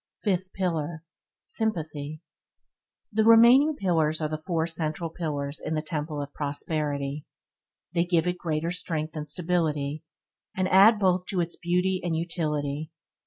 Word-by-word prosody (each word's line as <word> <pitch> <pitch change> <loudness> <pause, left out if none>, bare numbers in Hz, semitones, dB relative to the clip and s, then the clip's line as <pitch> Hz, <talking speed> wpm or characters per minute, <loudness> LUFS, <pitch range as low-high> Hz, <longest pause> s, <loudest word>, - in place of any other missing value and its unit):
Fifth 190 -2 0
pillar 165 -4 -2 0.2
– - - -65
Sympathy 155 -7 -3 0.9
The 220 0 +2
remaining 240 +7 +7
pillars 160 - +1
are 155 - 0
the 155 0 -3
four 165 -1 -1
central 165 0 -3
pillars 145 -3 -3
in 160 - -2
the 155 - -1
Temple 150 -2 -3
of 145 - -10
Prosperity. 145 -1 -3 0.7
They 170 0 +2
gave 175 -2 +2
it 180 0 -1
greater 160 0 -1
strength 160 -3 -3
and 150 -1 -4
stability, 155 -3 -1 0.5
and 185 0 +1
add 205 +4 +7
both 185 -2 +1
to 190 - -2
its 170 -1 0
beauty 180 +2 0
and 170 -2 -1
utility. 155 -3 -2
165 Hz, 145 wpm, -27 LUFS, 150-180 Hz, 0.9 s, remaining